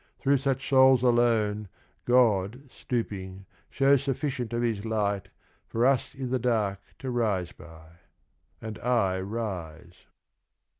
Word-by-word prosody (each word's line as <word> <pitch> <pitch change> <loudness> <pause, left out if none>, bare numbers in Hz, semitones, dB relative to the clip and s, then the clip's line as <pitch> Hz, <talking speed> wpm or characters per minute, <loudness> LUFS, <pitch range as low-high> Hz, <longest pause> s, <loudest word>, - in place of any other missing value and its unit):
Through 140 0 +2
such 135 0 -1
souls 130 -2 +5
alone 115 -4 +2 0.4
God 120 -1 +2
stooping 95 -5 -4 0.2
shows 135 -1 +3
sufficient 135 -3 -3
of 120 0 -1
His 110 -4 -1
light 105 -3 -1 0.4
For 115 +2 0
us 135 -2 +1
i' 135 - -3
the 130 +1 -1
dark 110 -5 0 0.2
to 130 - -5
rise 105 -8 0
by. 80 0 -15 0.6
And 110 -1 -7
I 110 -7 +1
rise. 90 -5 -6
115 Hz, 120 wpm, -27 LUFS, 100-125 Hz, 0.6 s, souls